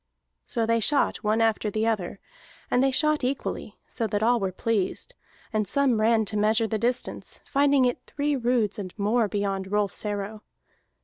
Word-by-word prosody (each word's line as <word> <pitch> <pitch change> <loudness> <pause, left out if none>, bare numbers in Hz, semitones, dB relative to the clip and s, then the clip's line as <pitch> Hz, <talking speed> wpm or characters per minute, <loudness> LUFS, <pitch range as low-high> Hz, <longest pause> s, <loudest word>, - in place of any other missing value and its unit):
So 230 - -1
they 230 +1 +2
shot 280 +6 +3
one 215 +1 0
after 225 -1 +1
the 215 +2 -1
other, 205 -4 -1 0.5
and 245 - +3
they 270 - +4
shot 305 +2 +1
equally, 250 -4 -3
so 230 - -3
far - - 0
that 210 0 -1
all 240 +1 +3
were 190 -2 -1
pleased, 215 - -2 0.4
and 215 -1 0
some 255 -1 +2
ran 220 0 +3
to 210 +1 -2
measure 215 +2 +3
the 220 -1 -2
distance, 245 +3 -2
finding 280 -2 +3
it 245 - 0 0.2
three 290 0 +1
roods 240 -5 0
and 185 -1 -7
more 215 +2 +2
beyond 195 -2 -2
Rolfs 205 -2 0
arrow. 205 0 -4
220 Hz, 180 wpm, -26 LUFS, 210-245 Hz, 0.5 s, they